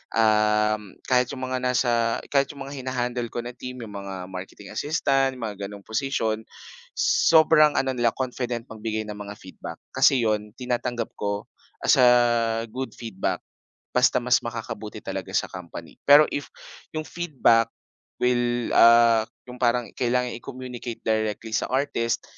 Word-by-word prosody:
uhm, 105 -2 +2
kahit 125 -1 +2
'yong 130 - -6
mga 130 0 -1
nasa 120 -2 +1
kahit 140 -1 +1
'yong 140 -2 -8
mga 140 - -7
hina-handle 125 -2 -2
ko - - -4
na 120 0 -7
team 125 0 -7
'yong 110 - -9
mga 100 -1 -6 0.2
marketing 95 +2 -9
assistant 135 -1 +1
mga 110 -3 -4
gano'ng 100 -1 -11
posisyon, 110 -2 -1 0.6
sobrang 160 - +5
ano 130 -1 -1
nila 120 -2 +2
confident 125 -2 -3
magbigay 110 -1 -4
ng 105 - -6
mga 105 -1 -7
feedback. 95 - -9 0.2
Kasi 135 - +5
'yon, 105 -1 0
tinatanggap 120 -2 -2
ko 100 0 -3 0.4
as - - +5
a 125 - +7 0.6
good 130 +2 -4
feedback 110 -5 -3 0.6
basta - - +4
mas - - +3
makakabuti - - -6
talaga - - -4
sa - - +1
company 85 -2 -9
pero 145 +2 +8
if 145 - -4 0.4
yung 155 0 -3
feedback 140 -10 +2 0.5
will, 120 -1 +1
ah, 115 -1 +7 0.3
'yong 125 - -10
parang 120 0 +2
kailangan 125 0 0
i-communicate 125 -1 -7
directly 110 0 -1
sa - - 0
artist, 130 -3 0
120 Hz, 145 wpm, -25 LUFS, 110-130 Hz, 0.6 s, pero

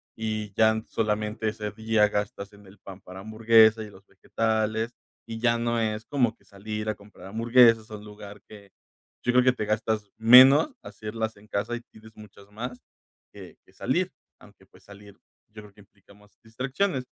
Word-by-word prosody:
y 110 -2 -4
ya 110 +1 +3
solamente 110 0 -2
ese 105 -1 -6
día 110 0 +1
gastas 105 -1 -4
en 100 0 -17
el 100 - -17
pan 95 0 -12
para 95 +2 -11
hamburguesas 110 0 +4
y - - -11
los 100 -1 -18
vegetales, 110 +3 -2 0.3
y 115 0 -6
ya 115 0 +2
no 120 0 -1
es 110 0 -3
como 125 -6 0
que - - -30
salir 105 +2 -7
a 110 - -1
comprar 100 -1 -15
hamburguesas 115 +1 +4
a 105 - -6
un 105 - -13
lugar 105 -1 -12
que 100 -2 -14 0.5
yo 125 - +1
creo 125 0 +5
que 130 - +5
te 110 - -4
gastas 105 -1 -2
menos 130 - +7
hacerlas 110 +1 -5
en 105 +1 -19
casa 105 +4 -3
y 120 - -7
tienes 110 0 -17
muchas 100 -1 -16
más 125 +4 -7 0.5
que - - -13
que - - -25
salir, - - -1 0.3
aunque - - -20
pues - - -22
salir, 100 0 -15 0.4
yo 105 0 -11
creo 105 -1 -16
que 105 - -18
implica 100 0 -23
más 105 0 -24
distracciones, 130 - -2
110 Hz, 185 wpm, -26 LUFS, 105-115 Hz, 0.5 s, menos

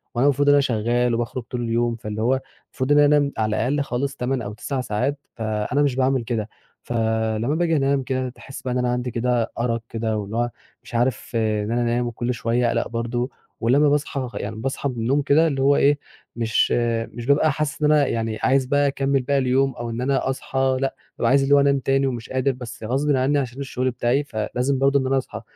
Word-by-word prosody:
وأنا 125 +4 +2
المفروض 145 +1 +2
إن 145 - +7
أنا 145 - +5
شغال 120 0 +1
وباخرج 120 +1 -3
طول 120 +1 -5
اليوم، 120 0 0
فاللي 105 -1 -5
هو 130 +3 +2 0.3
المفروض 130 +2 -3
إن 145 - +6
أنام 145 -1 +4
على 110 -1 0
الأقل 140 +6 0
خالص 140 +1 -2
8 125 0 -1
أو 105 -1 -5
9 130 +5 -3
ساعات 130 +6 -1 0.2
فأنا 110 +4 -1
مش 140 -3 +2
باعمل 130 -2 +1
كده 110 -2 -3 0.3
فلمّا 110 +2 0
باجي 165 -1 +1
أنام 135 -1 +1
كده، 130 0 -2
تحس 135 +2 -10
بقى 125 -1 -3
إن - - 0
أنا 125 -1 +1
عندي 125 0 -2
كده 120 0 0
أرق 115 -1 0
كده، 110 -1 -2
واللي 105 +2 -4
هو 120 0 +1 0.3
مش - - -10
عارف 120 +2 0
إن 110 -1 0
أنا 120 +1 +1
أنام، 120 +1 0
وكل 120 +1 -2
شوية 120 +1 0
أقلق - - 0
برضه 120 +2 -2 0.3
ولمّا 140 +6 +4
باصحى 140 -3 -1
يعني 110 +2 -4
باصحى 135 +5 -2
من 125 - -5
النوم 125 +6 +1
كده، 155 +4 +4
اللي 135 -3 -1
هو 140 +1 +4
إيه، 145 +1 +3 0.4
مش، 115 -2 +1 0.4
مش 120 +2 -8
بابقى 145 +2 +3
حاسس 150 0 -3
إن 150 0 +4
أنا 150 -2 +4
يعني 115 -1 -2
عايز 135 0 +3
بقى 145 +2 +2
أكمل 135 -1 +1
باقي 140 +2 0
اليوم 130 +1 +2
أو 120 0 -5
إن 115 +2 -4
أنا 135 0 0
أصحى 130 0 0
لأ، 135 - -1 0.2
بابقى 115 - +1
عايز 135 +1 +4
اللي 140 +1 +4
هو 140 - +6
أنام 140 -1 +3
تاني، 135 +1 +1
ومش 120 -3 -4
قادر 130 +1 +1
بس 125 -2 -9
غصبٍ 135 +5 +1
عني 135 +3 +2
عشان 130 0 -4
الشغل 130 -2 -2
بتاعي، 125 +4 +1
فلازم 125 +3 -2
برضه 140 +1 +3
إن 130 - -1
أنا 135 - +2
أصحى 115 -4 -4
125 Hz, 220 wpm, -23 LUFS, 115-140 Hz, 0.4 s, إن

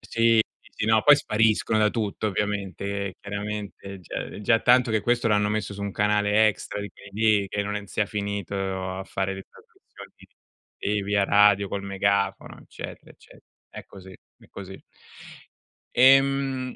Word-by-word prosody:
Sì, 115 0 +2 0.2
sì, - - -22
sì, - - -3
no, 110 0 +4
poi 145 - +9
spariscono 110 -4 +1
da 105 0 +3
tutto 110 -2 -3
ovviamente, 100 -2 -3 0.2
e 95 - -6
chiaramente 100 -1 -6
è 95 - -10
già 90 - -9
è - - -9
già 115 +2 +3
tanto 125 -1 +4
che 110 -1 +1
questo 120 +2 +1
l'hanno 105 -1 +2
messo 105 -1 -3
su 100 - -7
un 100 -1 -4
canale 105 +1 +3
extra 105 - -5
di 105 - -6
quelli 100 - -15 0.3
lì 100 - -5
che 105 +1 -2
non 105 0 -3
è 105 0 -6
sia 105 - -1
finito 100 -1 -4 0.4
a 95 - -6
fare 95 0 -3
le 95 - -8
trasmissioni, - - -17 0.7
ehm, 105 0 -1
via 100 0 +1
radio, 100 0 +4
col 100 +1 -4
megafono, 100 0 -1
eccetera - - -10
ecce - - -19 0.3
È - - -10
così, 95 -1 -13 0.3
è - - -20
così. 95 -1 -10 1.2
Ehm, 135 0 +3
105 Hz, 170 wpm, -25 LUFS, 100-110 Hz, 1.2 s, poi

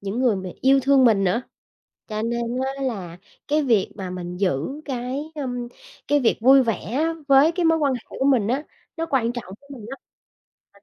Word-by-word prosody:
những 200 +4 -4
người 240 -6 +3
mà 185 -1 -5
yêu 270 +1 +4
thương 270 0 +4
mình 210 -5 +4
nữa, 210 +7 +1 0.7
cho 215 0 -3
nên 235 +1 -1 0.4
á 275 - -5
là 190 -10 -4 0.3
cái 300 +1 +2
việc 225 -8 +1
mà 190 -2 -5
mình 180 -1 -6
giữ 190 - -1
cái, 270 +3 -4
ưm, 245 -4 -4 0.4
cái 290 0 +3
việc 240 - +2
vui 265 +3 +7
vẻ 225 -3 0 0.2
á 325 +4 +1
với 275 +4 +6
cái 355 0 -1
mối 325 0 +3
quan 280 -3 +1
hệ 245 - -5
của 265 - -4
mình 245 -7 +3
á, 270 +5 -1 0.3
nó 330 0 -2
quan 240 -4 +1
trọng 235 -6 -7
với 280 - -23
mình 230 -6 -9
lắm. 270 - -7 0.8
Mình 200 - -23
250 Hz, 210 wpm, -23 LUFS, 210-275 Hz, 0.8 s, vui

